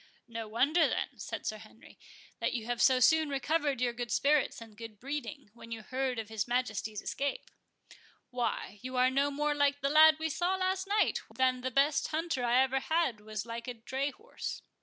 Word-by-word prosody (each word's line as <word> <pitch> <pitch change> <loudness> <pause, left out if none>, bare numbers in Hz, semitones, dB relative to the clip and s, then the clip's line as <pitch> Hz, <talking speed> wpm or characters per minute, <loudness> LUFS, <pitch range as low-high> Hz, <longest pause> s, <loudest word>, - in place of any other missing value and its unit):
"No 230 -2 -6
wonder, 285 +10 +3
then," - - -3
said - - -6
Sir 215 - -3
Henry, 220 +1 -16 0.4
"that - - 0
you 230 -3 -3
have 240 0 -2
so 260 -1 +5
soon 315 +4 +4
recovered 285 -1 0
your 245 -1 +1
good 240 0 -5
spirits 290 -2 +2
and 225 -2 -12
good 220 -2 -10
breeding, 280 -2 -6
when 230 0 -13
you 225 -1 -5
heard 260 +1 -2
of 225 -2 -4
his 220 -1 -3
Majesty's 220 -4 -2
escape. 280 0 -3 0.8
Why, 235 -4 -2
you 255 0 -5
are 255 +1 +4
no 280 +2 +2
more 295 +1 0
like 285 -1 +1
the 275 - +1
lad 310 +1 +8
we 320 0 -2
saw 350 +5 0
last 375 +1 -1
night, 415 +1 +2
than 255 -1 +1
the 260 - -1
best 275 +3 +2
hunter 315 -4 -2
I 245 +2 +4
ever 265 0 0
had 315 -6 0
was 215 0 -5
like 235 +1 -6
a 245 - -4
dray 265 +5 -2
horse." 445 - -7
260 Hz, 200 wpm, -31 LUFS, 230-295 Hz, 0.8 s, lad